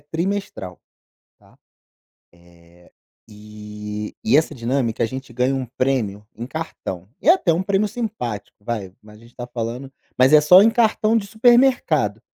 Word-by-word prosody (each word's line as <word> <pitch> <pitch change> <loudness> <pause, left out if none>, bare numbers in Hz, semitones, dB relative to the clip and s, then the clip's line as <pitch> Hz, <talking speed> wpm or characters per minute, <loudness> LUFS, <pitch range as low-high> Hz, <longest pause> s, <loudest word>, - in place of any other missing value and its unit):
trimestral, 165 - -4 0.6
tá, - - -25 0.8
eh, 85 0 -22 0.4
e 105 0 -8
e 115 +5 +4
essa 155 0 +1
dinâmica 120 -2 -1
a - - +2
gente 130 +1 -8
ganha 125 +3 0
um 130 -2 -3
prêmio 115 -5 -2
em 115 +2 -6
cartão, 130 - -6
e 285 - -2
é - - +10
até 275 - +2
um 170 - 0
prêmio 200 +2 0
simpático, 210 - -5
vai, 100 -4 -5
mas 105 0 -16
a - - -18
gente 115 +1 -19
tá 120 - -7
falando 120 +2 -5 0.3
mas 130 +2 +5
é 150 - +8
só 180 +6 +7
em 225 - +5
cartão 225 -1 +2
de 205 - -1
supermercado, 245 +4 +2
125 Hz, 160 wpm, -21 LUFS, -, 0.8 s, é